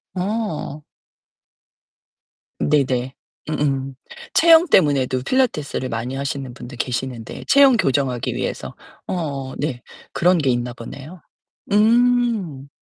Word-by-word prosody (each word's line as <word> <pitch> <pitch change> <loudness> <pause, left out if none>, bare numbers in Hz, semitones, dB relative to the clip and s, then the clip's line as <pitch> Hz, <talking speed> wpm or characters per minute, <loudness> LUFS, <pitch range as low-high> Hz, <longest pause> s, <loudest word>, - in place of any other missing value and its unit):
어. 185 -6 -3 1.8
네네. 130 -3 +1 0.4
음음. 135 -3 -1 0.4
체형 330 +1 +6
때문에도 135 - +3
필라테스를 155 - 0
많이 120 +3 -4
하시는 135 -2 -4
분들 125 -1 -10
계시는데, 125 -2 -4
체형 275 -3 +6
교정하기 135 - 0
위해서. - - -4 0.3
어. 140 -7 -3
네. 140 -4 -3 0.3
그런 180 +1 +3
게 140 -4 +1
있나 120 0 -1
보네요. 145 +8 -10 0.5
음. 225 - +2
140 Hz, 220 characters per minute, -21 LUFS, 130-195 Hz, 1.8 s, 체형